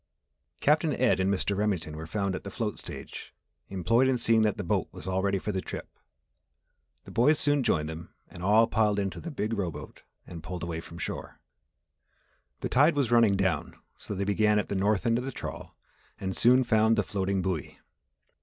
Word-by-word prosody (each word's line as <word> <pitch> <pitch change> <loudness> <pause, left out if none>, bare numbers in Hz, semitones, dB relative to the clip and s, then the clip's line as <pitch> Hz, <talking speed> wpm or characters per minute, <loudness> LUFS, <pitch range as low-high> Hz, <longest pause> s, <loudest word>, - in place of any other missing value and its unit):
Captain - - +3
Ed - - +2
and 95 +1 +2
Mr. 100 +1 0
Remington 95 -7 -1
were 80 +1 -7
found 100 +2 -1
at 90 - -5
the - - -6
float - - -3
stage - - -9 0.3
employed 115 +7 +2
in 130 -1 +2
seeing 115 -1 +3
that 105 -2 +1
the - - -3
boat - - 0
was - - -8
all 95 0 0
ready 100 0 +1
for 105 - -3
the 95 -2 -2
trip. - - -7 1.2
The - - -11
boys 145 +6 +4
soon 145 -1 +2
joined 75 -11 +1
them 80 +1 -7 0.2
and 85 - -12
all 105 +4 +5
piled 110 -3 +1
into 100 -2 -2
the 170 - -6
big 115 -7 -3
rowboat 95 -7 -5 0.2
and 85 -2 -9
pulled 85 +1 -6
away 85 -1 -3
from 85 - -11
shore. - - -6 1.2
The - - -1
tide 145 +5 +4
was 135 -5 0
running 115 -4 +5
down 95 -6 -1 0.2
so 105 - -5
they 95 - -1
began 105 +1 +2
at 105 - -1
the - - -2
north 100 +1 +1
end 115 0 +2
of - - -4
the 135 - -4
trawl - - -8 0.4
and 95 -1 -3
soon 125 +2 +5
found 110 -1 +3
the 105 - +1
floating 95 -1 -1
buoy. 90 -6 -3
100 Hz, 200 wpm, -28 LUFS, 95-115 Hz, 1.2 s, all